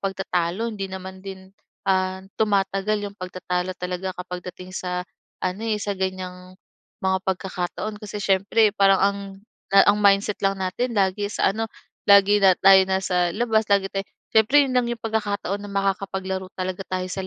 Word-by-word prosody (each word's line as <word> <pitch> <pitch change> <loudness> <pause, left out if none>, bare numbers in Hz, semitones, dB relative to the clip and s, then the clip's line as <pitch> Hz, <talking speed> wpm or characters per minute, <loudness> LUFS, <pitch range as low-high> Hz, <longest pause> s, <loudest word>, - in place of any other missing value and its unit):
pagtatalo, 190 +1 -1
hindi 200 -2 -4
naman 190 0 -8
din, 190 -1 -9 0.4
ah, 185 0 +1 0.2
tumatagal 205 0 +1
yung 200 - -17
pagtatalo 180 0 -3
talaga 180 +1 -4
kapag 180 0 -6
dating 185 0 -12
sa 180 -1 -3 0.4
ano, 185 +3 -2
eh, 220 -2 0
sa 200 0 -2
ganyang 185 -1 -5 0.5
mga 190 0 +2
pagkakataon, 190 +2 -3
kasi 210 -1 -6
siyempre 200 +3 +3
parang 195 -1 +4
ang 200 0 +2 0.6
ang 205 +1 +6
mindset 200 0 +3
lang 195 0 +3
natin 235 +7 -2
lagi 200 0 +1
sa - - +2
ano, 225 +3 -2 0.4
lagi 200 0 +6
na 190 -2 +6
tayo 195 +1 +7
nasa 185 -2 0
labas, 220 -1 +1
lagi 200 -1 +2
tayo 195 0 -3 0.2
siyempre 225 +7 +5
'yon 275 - -1
lang 245 -1 +3
yung 235 -1 -4
pagkakataon 205 -3 -2
na 205 0 -9
makakapaglaro 190 -1 -2
talaga 185 +1 -4
tayo 185 0 -3
sa 190 0 -4
195 Hz, 160 wpm, -23 LUFS, 185-205 Hz, 0.6 s, tayo